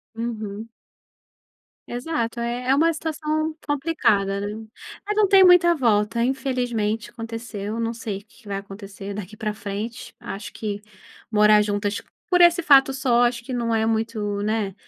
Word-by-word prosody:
Uhum. 220 Hz, -2 st, -5 dB, 1.2 s
Exato, 245 Hz, -2 st, -3 dB
é 240 Hz, +1 st, -2 dB
é 265 Hz, -, +5 dB
uma 330 Hz, +3 st, +4 dB
situação 310 Hz, 0 st, -2 dB
complicada, 235 Hz, -10 st, +1 dB
né. 205 Hz, -, -3 dB, 0.6 s
Mas 420 Hz, 0 st, -2 dB
não 425 Hz, -2 st, +4 dB
tem 385 Hz, -1 st, +7 dB
muita 350 Hz, -1 st, +6 dB
volta 230 Hz, -3 st, +2 dB
infelizmente 245 Hz, -4 st, -1 dB
aconteceu, 225 Hz, -2 st, -6 dB
não 230 Hz, 0 st, -1 dB
sei 220 Hz, -4 st, -5 dB
o 200 Hz, -, -21 dB
que 235 Hz, -, -23 dB
que 210 Hz, -, -18 dB
vai 200 Hz, -1 st, -3 dB
acontecer 200 Hz, 0 st, -8 dB
daqui 210 Hz, +1 st, -8 dB
para 215 Hz, -1 st, -2 dB
frente, 215 Hz, +3 st, -6 dB
acho 200 Hz, +3 st, -7 dB
que 205 Hz, -2 st, -5 dB, 0.5 s
morar 210 Hz, 0 st, +6 dB
juntas 205 Hz, 0 st, -1 dB, 0.3 s
por 360 Hz, -3 st, +3 dB
esse 345 Hz, 0 st, +6 dB
fato 270 Hz, -2 st, +6 dB
só, 255 Hz, -3 st, +2 dB
acho 240 Hz, -1 st, -1 dB
que 260 Hz, -, -6 dB
não 235 Hz, -2 st, -1 dB
é 220 Hz, 0 st, +2 dB
muito, 220 Hz, -2 st, -1 dB
né, 210 Hz, -2 st, -1 dB
230 Hz, 155 wpm, -23 LUFS, 210-270 Hz, 1.2 s, tem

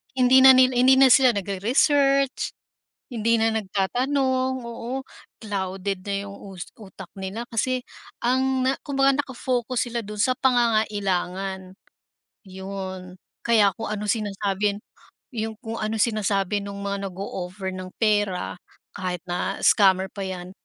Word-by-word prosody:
hindi 255 Hz, 0 st, +5 dB
na 265 Hz, -, +11 dB
nila 255 Hz, 0 st, +5 dB
hindi 260 Hz, +1 st, +6 dB
na 270 Hz, -, +8 dB
sila 255 Hz, -1 st, +6 dB
nagre-research, 270 Hz, -, +1 dB, 0.6 s
hindi 230 Hz, 0 st, +2 dB
na 225 Hz, 0 st, +1 dB
nagtatanong, 260 Hz, +6 st, 0 dB
oo 235 Hz, +3 st, -5 dB, 0.4 s
clouded 195 Hz, -1 st, -3 dB
na 200 Hz, -, -1 dB, 0.2 s
yung 200 Hz, -, -10 dB, 0.2 s
us 175 Hz, -, -7 dB
utak 190 Hz, -3 st, -12 dB
nila 190 Hz, +5 st, -4 dB
kasi 255 Hz, +3 st, -1 dB, 0.4 s
ang 260 Hz, +1 st, +1 dB
na 265 Hz, -, +2 dB
kumbaga 275 Hz, 0 st, +2 dB
naka-focus 250 Hz, -2 st, -2 dB
sila 235 Hz, -, -1 dB
dun 210 Hz, 0 st, -8 dB
sa 255 Hz, -, +3 dB
pangangailangan. 195 Hz, -6 st, 0 dB, 0.7 s
Yun, 190 Hz, -1 st, -7 dB, 0.3 s
kaya 215 Hz, -4 st, +4 dB
kung 225 Hz, -, -3 dB
anong 210 Hz, -1 st, -2 dB
sinasabing 205 Hz, -1 st, -1 dB, 0.6 s
yung 220 Hz, 0 st, -3 dB
kung 225 Hz, -1 st, -5 dB
anong 215 Hz, +1 st, -2 dB
sinasabi 205 Hz, -3 st, 0 dB
nung 200 Hz, 0 st, -7 dB
mga 200 Hz, 0 st, -3 dB
nago-offer 190 Hz, 0 st, -5 dB
ng 185 Hz, 0 st, -7 dB
pera, 205 Hz, -4 st, +1 dB, 0.4 s
kahit 180 Hz, -3 st, -3 dB
na 180 Hz, +2 st, -2 dB
scammer 190 Hz, -2 st, +5 dB
pa 200 Hz, -, -7 dB
yan, 185 Hz, -1 st, -6 dB
210 Hz, 130 wpm, -24 LUFS, 195-250 Hz, 0.7 s, na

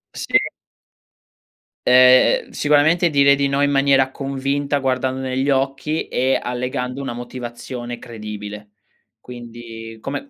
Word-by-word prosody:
Sì. -, -, +2 dB, 1.5 s
Eh, 125 Hz, 0 st, +6 dB
ehm, -, -, -19 dB
sicuramente 155 Hz, +4 st, +3 dB
dire 140 Hz, -2 st, +5 dB
di 140 Hz, 0 st, 0 dB
no 140 Hz, +1 st, 0 dB
in 145 Hz, -, +3 dB
maniera 135 Hz, -1 st, +3 dB
convinta 140 Hz, +1 st, -2 dB
guardando 130 Hz, -1 st, -1 dB
negli 130 Hz, +1 st, -1 dB
occhi, 135 Hz, +3 st, -1 dB
e 130 Hz, +1 st, +1 dB
allegando 125 Hz, +1 st, -3 dB
una 135 Hz, -, -4 dB
motivazione 120 Hz, 0 st, -7 dB
credibile. 105 Hz, -3 st, -8 dB, 0.5 s
Quindi, 115 Hz, -2 st, -10 dB
come 145 Hz, -, -5 dB
130 Hz, 115 wpm, -20 LUFS, 120-140 Hz, 1.5 s, Eh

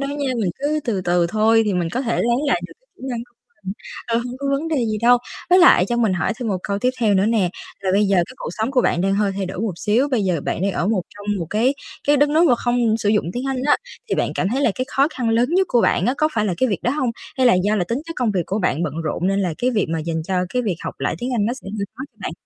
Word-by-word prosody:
đâu 275 Hz, -, -2 dB
nha, 285 Hz, -1 st, -2 dB
mình 190 Hz, -5 st, 0 dB
cứ 295 Hz, +2 st, 0 dB
từ 215 Hz, -6 st, -1 dB
từ 175 Hz, -1 st, +2 dB
thôi 220 Hz, +4 st, +3 dB
thì 205 Hz, -, 0 dB
mình 175 Hz, -2 st, 0 dB
có 250 Hz, -, -1 dB
thể 235 Hz, -3 st, -1 dB
lấy 240 Hz, 0 st, +2 dB
lại 250 Hz, -11 st, +2 dB
được -, -, -14 dB
cái -, -, -40 dB
kỹ -, -, -18 dB
năng 240 Hz, -, -2 dB
của 245 Hz, 0 st, -32 dB
mình. 195 Hz, -4 st, -9 dB, 0.3 s
Ờ, 230 Hz, -, +1 dB
hông 245 Hz, +1 st, -5 dB
có 280 Hz, -, -4 dB
vấn 280 Hz, +4 st, -1 dB
đề 320 Hz, -, 0 dB
gì 215 Hz, -1 st, -1 dB
đâu. 245 Hz, +1 st, +6 dB, 0.3 s
Với 365 Hz, -, +7 dB
lại 345 Hz, -, +7 dB
cho 240 Hz, -, 0 dB
mình 225 Hz, -5 st, +2 dB
hỏi 175 Hz, -4 st, 0 dB
thêm 240 Hz, -, -3 dB
một 195 Hz, -, 0 dB
câu 200 Hz, -1 st, -2 dB
tiếp 250 Hz, +4 st, +2 dB
theo 215 Hz, -3 st, +3 dB
nữa 195 Hz, +1 st, +3 dB
nè, 215 Hz, -6 st, +2 dB, 0.3 s
là 195 Hz, -1 st, -1 dB
bây 205 Hz, +2 st, +4 dB
giờ 195 Hz, -1 st, +2 dB
cái 180 Hz, +8 st, 0 dB
cuộc -, -, -5 dB
sống 220 Hz, +3 st, -2 dB
của 265 Hz, -2 st, +3 dB
bạn 175 Hz, -, +1 dB
đang 195 Hz, +1 st, +1 dB
hơi 200 Hz, -1 st, +1 dB
thay 195 Hz, -1 st, -2 dB
đổi 185 Hz, -, -6 dB
một 220 Hz, -3 st, -1 dB
xíu, 220 Hz, +10 st, +1 dB
bây 250 Hz, -6 st, +1 dB
giờ 180 Hz, -5 st, 0 dB
bạn -, -, -2 dB
đang 195 Hz, 0 st, +1 dB
ở 180 Hz, -, -1 dB
một 210 Hz, -4 st, +1 dB
trong 205 Hz, 0 st, -10 dB
một 170 Hz, -, -3 dB
cái 240 Hz, +6 st, +2 dB, 0.3 s
cái 290 Hz, +1 st, +5 dB
đất 290 Hz, +1 st, +4 dB
nước 315 Hz, +3 st, +4 dB
mà 250 Hz, -, +5 dB
không 240 Hz, -2 st, +1 dB
sử 210 Hz, -, -1 dB
dụng 210 Hz, 0 st, +2 dB
tiếng 245 Hz, +2 st, -4 dB
Anh 260 Hz, -1 st, -2 dB
á 295 Hz, -, +5 dB, 0.3 s
thì -, -, +1 dB
bạn -, -, 0 dB
cảm 185 Hz, -, 0 dB
thấy 255 Hz, +6 st, -1 dB
là 240 Hz, -, +4 dB
cái 255 Hz, -, -2 dB
khó 275 Hz, +2 st, +2 dB
khăn 255 Hz, -7 st, -3 dB
lớn 235 Hz, +2 st, +2 dB
nhất 375 Hz, +2 st, +3 dB
của 240 Hz, -, +3 dB
bạn 185 Hz, -, +2 dB
á 250 Hz, -, +2 dB
có 310 Hz, -, +3 dB
phải 215 Hz, -2 st, +1 dB
là 185 Hz, -, 0 dB
cái 260 Hz, -, +2 dB
việc 200 Hz, -, -1 dB
đó 245 Hz, -, +1 dB
hông? 260 Hz, -3 st, 0 dB, 0.3 s
Hay 260 Hz, -, +4 dB
là 240 Hz, -, +6 dB
do 210 Hz, +1 st, +2 dB
là 180 Hz, -, +1 dB
tính 230 Hz, +8 st, -2 dB
chất 330 Hz, -, -5 dB
công 245 Hz, -3 st, +1 dB
việc 185 Hz, -3 st, 0 dB
của 200 Hz, -, -1 dB
bạn 175 Hz, -5 st, 0 dB
bận 150 Hz, -4 st, -2 dB
rộn 160 Hz, +3 st, -1 dB
nên 195 Hz, +1 st, +1 dB
là 180 Hz, -4 st, -1 dB
cái 250 Hz, -, +1 dB
việc 215 Hz, -6 st, +1 dB
mà 165 Hz, -, 0 dB
dành 160 Hz, 0 st, -3 dB
cho 190 Hz, -, -2 dB, 0.2 s
cái 250 Hz, -, +1 dB
việc 200 Hz, -7 st, -1 dB
học -, -, -4 dB
lại -, -, 0 dB
tiếng 245 Hz, +6 st, -3 dB
Anh 210 Hz, -3 st, +1 dB
nó 235 Hz, -, 0 dB
sẽ 255 Hz, -, -10 dB
hơi 200 Hz, -, -1 dB
khó 255 Hz, -, -7 dB
cho 220 Hz, -, -37 dB
bạn? 165 Hz, -, -3 dB
225 Hz, 325 wpm, -21 LUFS, 195-255 Hz, 0.3 s, Với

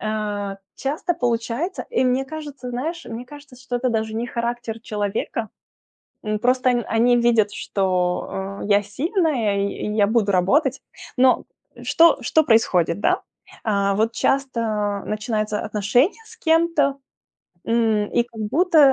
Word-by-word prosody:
Э, 210 Hz, -2 st, -3 dB, 0.2 s
часто 295 Hz, +6 st, -2 dB
получается, 245 Hz, +5 st, -2 dB
и 455 Hz, -, +2 dB
мне 255 Hz, +2 st, +1 dB
кажется, 285 Hz, -4 st, -7 dB
знаешь, 315 Hz, +8 st, -4 dB
мне 235 Hz, +2 st, -6 dB
кажется, 290 Hz, -1 st, -13 dB
что 255 Hz, -1 st, -4 dB
это 255 Hz, +1 st, 0 dB
даже 220 Hz, -2 st, -1 dB
не 230 Hz, +2 st, -2 dB
характер 235 Hz, -1 st, -3 dB
человека. 215 Hz, 0 st, -3 dB, 0.8 s
М, 215 Hz, 0 st, -1 dB
просто 255 Hz, +2 st, +2 dB
он 240 Hz, -1 st, 0 dB
они 240 Hz, +2 st, +3 dB
видят, 230 Hz, -3 st, +3 dB
что, 190 Hz, +1 st, -2 dB
э, -, -, -4 dB
я 205 Hz, 0 st, +4 dB
сильная, 255 Hz, -, 0 dB
и 200 Hz, -, +1 dB, 0.2 s
и 210 Hz, -, -2 dB
я 205 Hz, -1 st, +4 dB
буду 215 Hz, -2 st, +2 dB
работать. 265 Hz, -, +2 dB, 0.4 s
Но 255 Hz, 0 st, +4 dB, 0.4 s
что 330 Hz, -3 st, +5 dB
что 315 Hz, +6 st, +3 dB
происходит, 195 Hz, -, +2 dB
да? 365 Hz, -, +2 dB, 0.4 s
А, 200 Hz, -2 st, +1 dB
вот 220 Hz, +3 st, +1 dB
часто 225 Hz, -7 st, 0 dB
начинаются 215 Hz, -1 st, -2 dB
отношения 215 Hz, -, +1 dB
с 455 Hz, +1 st, -14 dB
кем-то, 320 Hz, -5 st, +2 dB, 0.7 s
м, 225 Hz, -2 st, +2 dB
и 240 Hz, -, +3 dB
как 230 Hz, -2 st, -11 dB
будто, 320 Hz, -, +2 dB
235 Hz, 145 wpm, -22 LUFS, 210-270 Hz, 0.8 s, что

